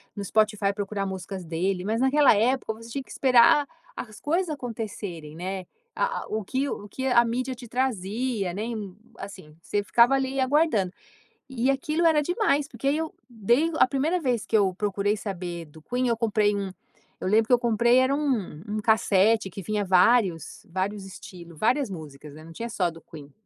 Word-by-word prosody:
no 200 - -4
Spotify, 210 -1 +1
procurar 200 -1 -3
músicas 190 0 -6
dele. 180 +3 -2
Mas 220 +4 -1
naquela 265 -2 +5
época 245 +3 +1
você 230 +1 -12
tinha 275 +1 -4
que - - -25
esperar 260 +2 +5 0.3
as 215 -3 -8
coisas 340 +5 0
acontecerem, 205 - -6
né. 185 +2 -5 0.3
A - - -1
a - - -14
o 215 -1 -3
que 265 +7 -1
o 205 - -6
que 260 +6 -4
a 240 -2 +5
mídia 250 +2 -2
te 240 -1 -11
trazia, 225 -4 -1
né, 205 - -4
em, 215 -5 -5 0.2
assim, 185 -6 -10
você 205 +4 -2
ficava 235 +5 +4
ali 270 0 0
aguardando. 260 - +2 0.6
E 260 0 0
aquilo 310 +5 0
era 315 -2 +5
demais, 295 -5 +1
porque 235 +3 -3
aí 295 +3 +2
eu 320 -1 -4 0.2
dei 240 +8 +2
a - - +6
primeira 300 +7 0
vez 245 -7 0
que 225 - +1
eu 195 -3 +2
procurei 205 +1 0
saber 180 -4 -5
do 155 0 -16
Queen, 250 +8 -1
eu 235 - +1
comprei 215 -2 +1
um 200 -1 -3 0.5
eu - - -2
lembro 220 +2 +4
que 250 - -1
eu 245 - +7
comprei, 235 +1 +3
era 260 +1 +3
um 250 - -2
um 215 0 -2
cassete 215 -1 +3
que 195 +2 -8
vinha 210 +1 -1
vários 185 - +2
vários 195 +2 -3
estilos, 170 -3 -11
várias 255 - +2
músicas, 150 -5 -9
né, 155 - -12
não 165 - -12
tinha 230 +8 -5
só 185 -5 0
do 165 0 -13
Queen. 145 -3 -13
215 Hz, 190 wpm, -26 LUFS, 190-255 Hz, 0.6 s, eu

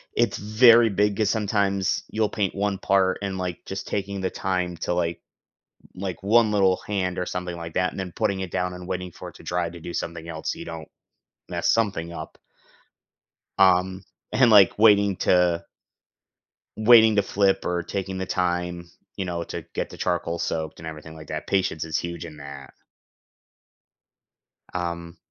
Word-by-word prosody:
It's - - +1
very 115 +2 +6
big 105 0 +1
'cause 105 -2 +2
sometimes 100 -3 0
you'll 110 -1 0
paint 100 -3 -1
one 100 0 0
part 95 -1 +2
and, 95 -1 -3
like, 90 -2 -4
just 95 0 -6
taking 100 0 -3
the 95 - 0
time 90 -2 -2
to, 90 - -1
like 85 -1 -1 0.7
like, 95 -1 -5
1 110 +2 +4
little 95 -3 +3
hand 95 -3 -1
or 90 - -1
something 90 -1 -4
like 85 -1 -7
that, 90 +2 +1
and - - -8
then 95 -2 -4
putting 95 -1 -1
it 95 -2 -5
down 90 0 -1
and 90 0 -9
waiting 90 -1 -4
for - - -9
it - - -18
to - - -15
dry 90 -1 -1
to 85 - -10
do 85 +1 -7
something 85 -1 -4
else 80 -1 -3
so - - -11
you - - -7
don't 80 -2 -7 0.6
mess - - -1
something 95 -7 -1
up 80 -2 -8 1.2
um, 95 0 +4 0.3
and 125 -3 +5
like, 100 -3 +6
waiting 100 -3 +5
to 90 -2 +2 1.1
waiting 110 -1 +7
to 100 - +4
flip 100 0 +1
or 90 0 -1
taking 95 +1 -4
the 95 - -3
time, 90 -1 -2 0.3
you 95 - -2
know, 85 -2 -3
to - - -6
get - - -2
the - - -10
charcoal 85 -1 -1
soaked 80 -2 -3
and 80 - -10
everything 80 0 -8
like 80 -1 -12
that. - - -5
Patience 95 -5 0
is 80 0 -1
huge 85 0 -5
in 80 -2 -9
that. 70 -2 -10 2.0
Um 85 -1 -4
90 Hz, 180 wpm, -24 LUFS, 85-100 Hz, 2.0 s, waiting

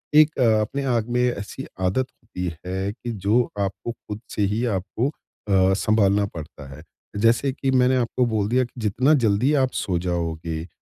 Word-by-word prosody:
एक 155 0 +6
अ, 110 -4 +4
अपने 135 +6 -2
आग 115 0 -1
में 125 +1 +1
ऐसी 105 +5 -7
आदत 95 +8 +1
होती 90 -6 -6
है 95 +2 -2
कि, 120 +1 -6
जो 105 +4 +2 0.2
आपको 100 +4 -2
खुद 105 -2 -9
से - - -1
ही 115 +3 -1
आपको 100 +8 -2
अ, 95 -9 0
सँभालना 100 -1 +2
पड़ता 80 -6 -9
है। 75 - -12 0.4
जैसे 115 +5 +3
कि 135 0 -1
मैंने 130 0 +4
आपको 125 +1 +1
बोल 110 -4 0
दिया 130 +2 +3
कि, 125 - -8
जितना 125 +8 +3
जल्दी 110 +7 +3
आप 130 - 0
सो 90 -3 -1
जाओगे 85 -2 -3
110 Hz, 180 wpm, -23 LUFS, 95-125 Hz, 0.4 s, एक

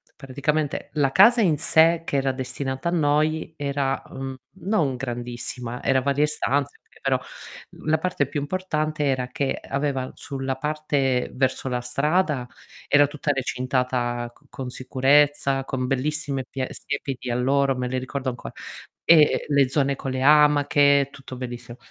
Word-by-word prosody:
praticamente 140 +2 -2
la 140 -3 +2
casa 230 - +6
in 160 -7 +3
sé 165 +2 +4
che 140 - -1
era 135 0 +1
destinata 130 +3 -3
a - - -2
noi 155 0 +1
era, 140 -1 -1
mhmm, 135 0 -6 0.3
non 155 - +1
grandissima, 120 -1 -5
era 130 -1 +3
varie 140 +2 +2
stanze, 145 -2 -1
okay, - - -24
però - - +1 0.7
la 155 +1 +2
parte 180 -6 0
più 145 +1 -3
importante 155 -2 -2
era 130 -2 0
che 140 0 -2
aveva 140 -2 -1
sulla 135 -1 -4
parte 145 -3 0
verso 130 0 0
la 125 -1 -1
strada, 140 +1 0 0.4
era 145 0 +6
tutta 145 0 -1
recintata 125 -2 -1
c - - -27
con 130 -2 -6
sicurezza, 135 +1 +2
con 130 -1 -2
bellissime 135 0 -1
pia 130 -1 -3
siepi 140 -2 -4
di 125 - -5
alloro, 135 +2 +2
me 125 0 -2
le 130 0 -2
ricordo 130 +1 -3
ancora, 125 - -8 0.5
e 155 -3 +5
le 140 -3 +3
zone 140 0 +1
con 135 - -4
le 130 0 -2
amache, 145 -1 +5
tutto 130 -1 -10
bellissimo. 120 -1 -7
135 Hz, 150 wpm, -24 LUFS, 130-150 Hz, 0.7 s, casa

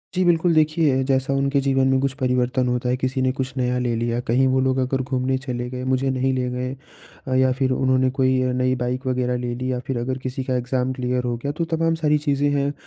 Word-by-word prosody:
जी, 185 - +2
बिल्कुल 170 0 +3
देखिए, 155 -4 +2
जैसा 130 0 0
उनके 140 +1 +1
जीवन 135 -1 +2
में 135 0 +3
कुछ 135 -1 0
परिवर्तन 125 0 +1
होता 125 0 -1
है 125 - +1
किसी 130 +1 -1
ने 130 0 +2
कुछ 130 0 -4
नया 125 -1 0
ले 120 -2 0
लिया, 115 +1 -1
कहीं 125 +2 +2
वो 130 0 +2
लोग 130 0 +1
अगर 130 +1 0
घूमने 130 0 -1
चले 125 -2 -4
गए 125 0 -5
मुझे 130 +1 +1
नहीं 130 0 0
ले 125 -1 -1
गए 125 +1 -3 0.6
अ, 130 - -1
या 130 0 +4
फिर 130 0 0
उन्होंने 130 0 +2
कोई 130 -1 +2
अ, 130 0 +1
नई 130 0 +1
बाइक 125 +2 -3
वग़ैरह 125 -1 0
ले 120 0 -3
ली 130 +1 -3
या 125 - -1
फिर 135 - -1
अगर 130 +2 -2
किसी 130 0 -3
का 130 -1 -1
एग्ज़ाम 125 +1 -1
क्लियर 125 -1 -1
हो 120 -1 -1
गया, 140 +4 -3
तो 165 +3 -2
तमाम 165 0 0
सारी 150 -2 +2
चीज़ें 145 -1 0
हैं, 140 0 0
130 Hz, 245 wpm, -22 LUFS, 125-135 Hz, 0.6 s, या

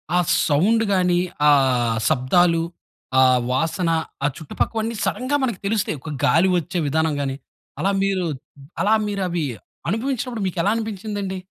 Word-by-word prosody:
ఆ - - +4 0.3
సౌండ్ 205 +10 +3
గాని, 180 -1 +2 0.3
ఆ - - +8 0.6
శబ్దాలు, 165 +6 +3 0.6
ఆ - - +7 0.3
వాసన, 165 +6 0 0.4
ఆ - - +5
చుట్టుపక్కవన్ని 220 +8 -2
సడెన్‌గా 270 +3 0
మనకు 235 -8 -1
తెలుస్తాయి. 200 -7 0
ఒక 155 - -7
గాలి 170 +5 +4
వచ్చే 175 +2 -2
విధానం 160 +2 +1
గాని, 135 -1 -2 0.4
అలా 190 +6 +1
మీరు 195 -2 0 0.6
అలా 210 +3 +3
మీరు 200 -1 -3
అవి 170 -3 -1 0.4
అనుభవించినప్పుడు 235 0 -2
మీకు 180 - -5
ఎలా 205 - +2
అనిపించింది 215 -2 -4
అండి? 190 0 -4
185 Hz, 140 wpm, -22 LUFS, 165-220 Hz, 0.6 s, ఆ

